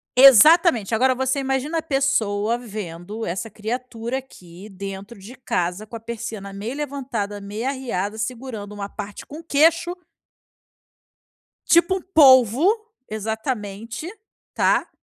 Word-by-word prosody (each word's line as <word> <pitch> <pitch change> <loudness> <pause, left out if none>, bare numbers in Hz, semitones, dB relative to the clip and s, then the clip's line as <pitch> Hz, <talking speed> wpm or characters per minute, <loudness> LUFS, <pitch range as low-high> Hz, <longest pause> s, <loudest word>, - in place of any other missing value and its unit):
Exatamente, 270 - +7
agora 260 +3 +3
você 260 +2 -1
imagina 270 +4 -1
a - - -2
pessoa 235 -7 0
vendo 210 -2 -7
essa 190 +5 -3
criatura 235 +3 -4
aqui 185 -7 -13
dentro 195 +2 -8
de 205 +6 -11
casa, 190 -5 -2
com 230 - -8
a - - -8
persiana 220 -3 -6
meio 215 +7 -5
levantada, 255 -8 -4
meio 210 +5 -5
arreada, 220 -6 -3
segurando 225 -3 -5
uma 200 -1 -6
parte 205 -1 -8
com 305 +3 -10
queixo. 330 +3 +2 1.7
Tipo 345 +3 +4
um 375 - -6
polvo, 265 - +5 0.4
exatamente, 220 - -4 0.5
tá. - - +2
230 Hz, 120 wpm, -22 LUFS, 205-270 Hz, 1.7 s, Exatamente